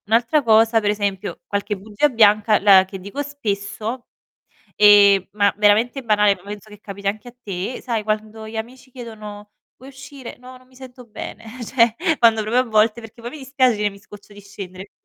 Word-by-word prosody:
Un'altra 235 Hz, +7 st, +2 dB
cosa, 225 Hz, 0 st, +4 dB
per 210 Hz, -2 st, -1 dB
esempio 205 Hz, -1 st, -3 dB
qualche 205 Hz, 0 st, -3 dB
bugia 210 Hz, +9 st, 0 dB
bianca 215 Hz, -3 st, +4 dB
la 195 Hz, -2 st, +6 dB
che 190 Hz, 0 st, -9 dB
dico 200 Hz, +10 st, -6 dB
spesso, 225 Hz, -3 st, -5 dB, 0.7 s
ehm, 200 Hz, -2 st, +6 dB
ma 205 Hz, -1 st, +2 dB
veramente 215 Hz, +6 st, +2 dB
banale, 210 Hz, -3 st, +3 dB
poi -, -, -20 dB
penso 205 Hz, +1 st, -9 dB
che 210 Hz, -1 st, -14 dB
capiti 200 Hz, -1 st, -10 dB
anche 215 Hz, +4 st, -3 dB
a 245 Hz, -, -12 dB
te, 195 Hz, +4 st, -5 dB
sai 230 Hz, -4 st, -2 dB
quando 215 Hz, +1 st, -4 dB
gli 220 Hz, -, -10 dB
amici 250 Hz, +4 st, -8 dB
chiedono: 210 Hz, -4 st, -10 dB, 0.2 s
"Puoi 260 Hz, +3 st, -14 dB
uscire?", 265 Hz, -1 st, -11 dB
"No 255 Hz, +1 st, -13 dB
non 255 Hz, -, -23 dB
mi 255 Hz, -, -24 dB
sento 255 Hz, -1 st, -13 dB
bene.", 225 Hz, 0 st, -9 dB, 0.2 s
cioè 230 Hz, -1 st, +2 dB, 0.2 s
quando 230 Hz, -2 st, +4 dB
proprio 235 Hz, +4 st, +1 dB
a -, -, -11 dB
volte 220 Hz, 0 st, +2 dB
perché 225 Hz, +1 st, -14 dB
poi 235 Hz, -, -6 dB
mi 310 Hz, -, -9 dB
dispiace 265 Hz, -1 st, +1 dB
di -, -, -6 dB
dire: 210 Hz, 0 st, 0 dB
"Mi 200 Hz, -, -15 dB
scoccio 205 Hz, 0 st, -15 dB
di 205 Hz, -, -13 dB
scendere". 195 Hz, -1 st, -10 dB
215 Hz, 195 wpm, -20 LUFS, 205-240 Hz, 0.7 s, la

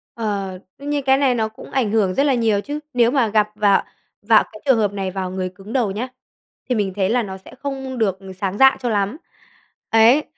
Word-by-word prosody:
Ờ, 205 Hz, -4 st, -2 dB, 0.3 s
đương 285 Hz, +1 st, -7 dB
nhiên 290 Hz, -1 st, 0 dB
cái 265 Hz, 0 st, +4 dB
này 270 Hz, -3 st, +2 dB
nó 220 Hz, -2 st, 0 dB
cũng 220 Hz, -, -13 dB
ảnh 240 Hz, -6 st, 0 dB
hưởng 205 Hz, -4 st, +2 dB
rất 275 Hz, -, +2 dB
là 285 Hz, -, +3 dB
nhiều 225 Hz, -4 st, +2 dB
chứ. 290 Hz, +5 st, -5 dB
Nếu 240 Hz, -1 st, +3 dB
mà 265 Hz, -5 st, +2 dB
gặp 210 Hz, 0 st, +2 dB
vào 205 Hz, -2 st, +3 dB, 0.4 s
vào 220 Hz, +1 st, +5 dB
cái 215 Hz, -, -12 dB
trường 265 Hz, -4 st, +4 dB
hợp 205 Hz, -2 st, +1 dB
này 195 Hz, -2 st, -3 dB
vào 185 Hz, -1 st, -4 dB
người 185 Hz, -1 st, -3 dB
cứng 200 Hz, +4 st, -10 dB
đầu 235 Hz, -7 st, +1 dB
nhá, 220 Hz, +6 st, -3 dB, 0.6 s
thì 250 Hz, -, +2 dB
mình 200 Hz, -4 st, -1 dB
thấy 195 Hz, -2 st, +1 dB
là 240 Hz, +1 st, +2 dB
nó 190 Hz, -1 st, -6 dB
sẽ 190 Hz, -, -15 dB
không 270 Hz, -2 st, -5 dB
được 200 Hz, -5 st, +1 dB, 0.2 s
sáng 195 Hz, 0 st, -2 dB
dạ 265 Hz, +2 st, +6 dB
cho 245 Hz, -, -1 dB
lắm. 205 Hz, +3 st, 0 dB, 0.7 s
Ấy. 230 Hz, +7 st, +5 dB
220 Hz, 230 wpm, -20 LUFS, 200-260 Hz, 0.7 s, dạ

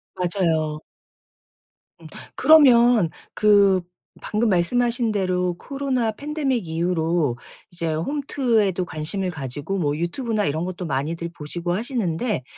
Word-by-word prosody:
맞아요. 165 Hz, -4 st, 0 dB, 1.2 s
음. -, -, -11 dB, 0.3 s
그러면 245 Hz, -, +6 dB, 0.2 s
그 200 Hz, -3 st, +4 dB, 0.4 s
방금 215 Hz, +1 st, 0 dB
말씀하신 235 Hz, +5 st, +1 dB
대로 180 Hz, -3 st, 0 dB
코로나 265 Hz, -5 st, -1 dB
팬데믹 270 Hz, -, -2 dB
이후로 165 Hz, -5 st, 0 dB, 0.3 s
이제 165 Hz, -2 st, -2 dB
홈트에도 225 Hz, -, 0 dB
관심을 175 Hz, +4 st, -3 dB
가지고 145 Hz, +4 st, -4 dB
뭐 145 Hz, -4 st, 0 dB
유튜브나 210 Hz, -, -2 dB
이런 160 Hz, +4 st, -1 dB
것도 185 Hz, 0 st, -5 dB
많이들 160 Hz, +5 st, -3 dB
보시고 175 Hz, +4 st, -4 dB
하시는데 215 Hz, -, -2 dB
185 Hz, 265 characters per minute, -22 LUFS, 165-235 Hz, 1.2 s, 그러면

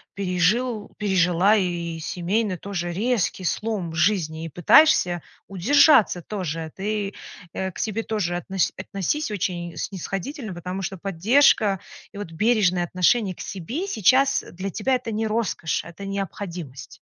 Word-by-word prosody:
пережил 200 Hz, +5 st, 0 dB
пережила 190 Hz, 0 st, +3 dB
и 170 Hz, -4 st, -2 dB
семейный 185 Hz, +4 st, -1 dB
тоже 175 Hz, -3 st, -4 dB
резкий 210 Hz, -2 st, 0 dB
слом 200 Hz, -2 st, -2 dB
в -, -, -8 dB
жизни, 165 Hz, -3 st, +1 dB
и -, -, -5 dB
пытаешься 175 Hz, -, +5 dB, 0.3 s
удержаться 230 Hz, -, +5 dB
тоже. 165 Hz, -6 st, -4 dB
Ты, 205 Hz, 0 st, -2 dB, 0.4 s
э, 190 Hz, 0 st, -3 dB
к -, -, -13 dB
себе 220 Hz, 0 st, -1 dB
тоже 195 Hz, -6 st, -2 dB
относь 190 Hz, +1 st, -1 dB
относись 200 Hz, -, -2 dB
очень 175 Hz, -4 st, -3 dB
снисходительно, 195 Hz, -, -5 dB
потому 180 Hz, +2 st, -5 dB
что 190 Hz, +1 st, -4 dB
поддержка 200 Hz, -, +3 dB, 0.3 s
и 200 Hz, -, -10 dB
вот 205 Hz, -5 st, -6 dB
бережное 185 Hz, -2 st, +2 dB
отношение 185 Hz, +2 st, +2 dB
к -, -, -10 dB
себе 235 Hz, -, -4 dB
сейчас 265 Hz, -, +3 dB
для 190 Hz, +2 st, -4 dB
тебя- 255 Hz, +7 st, 0 dB
это 245 Hz, -2 st, -4 dB
не 220 Hz, +1 st, -1 dB
роскошь, 215 Hz, -7 st, -1 dB
это 170 Hz, +4 st, -10 dB
необходимость. 180 Hz, -7 st, -6 dB
195 Hz, 140 wpm, -24 LUFS, 175-215 Hz, 0.4 s, пытаешься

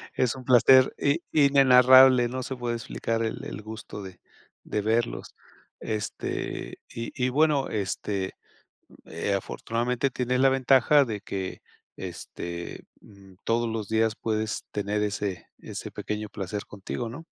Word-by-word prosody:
Es 125 Hz, 0 st, +1 dB
un 130 Hz, -2 st, -10 dB
placer 130 Hz, +1 st, +6 dB
i 145 Hz, +3 st, +2 dB
inenarrable, 130 Hz, -3 st, +7 dB
no 130 Hz, +1 st, -4 dB
se 130 Hz, -, -4 dB
puede 120 Hz, -1 st, -3 dB
explicar 115 Hz, 0 st, -3 dB
el 110 Hz, -, -3 dB
el 105 Hz, -, -7 dB
gusto 110 Hz, -1 st, -8 dB
de 95 Hz, -2 st, -11 dB, 0.4 s
de 105 Hz, -, -2 dB
verlos 115 Hz, +2 st, -1 dB, 0.5 s
este 105 Hz, -2 st, -4 dB
y 115 Hz, 0 st, -6 dB
y 125 Hz, -1 st, 0 dB
bueno, 145 Hz, 0 st, +2 dB
este, 95 Hz, -1 st, -3 dB, 0.7 s
eh, 85 Hz, +5 st, -2 dB
afortunadamente 120 Hz, +6 st, -2 dB
tienes 125 Hz, 0 st, -1 dB
la 135 Hz, 0 st, +5 dB
ventaja 135 Hz, +2 st, +4 dB
de 105 Hz, -4 st, -5 dB
que 95 Hz, -1 st, -5 dB, 0.4 s
este, 85 Hz, -1 st, -7 dB, 0.2 s
mm, 95 Hz, -2 st, -17 dB
todos 115 Hz, 0 st, 0 dB
los 110 Hz, -3 st, -4 dB
días 110 Hz, 0 st, +2 dB
puedes 110 Hz, -1 st, -2 dB
tener 105 Hz, +1 st, -1 dB
ese 100 Hz, -3 st, -3 dB
ese -, -, -7 dB
pequeño 105 Hz, 0 st, -4 dB
placer 100 Hz, +1 st, -5 dB
contigo, 105 Hz, +4 st, -5 dB
¿no? 145 Hz, +8 st, -9 dB
115 Hz, 140 wpm, -26 LUFS, 105-130 Hz, 0.7 s, inenarrable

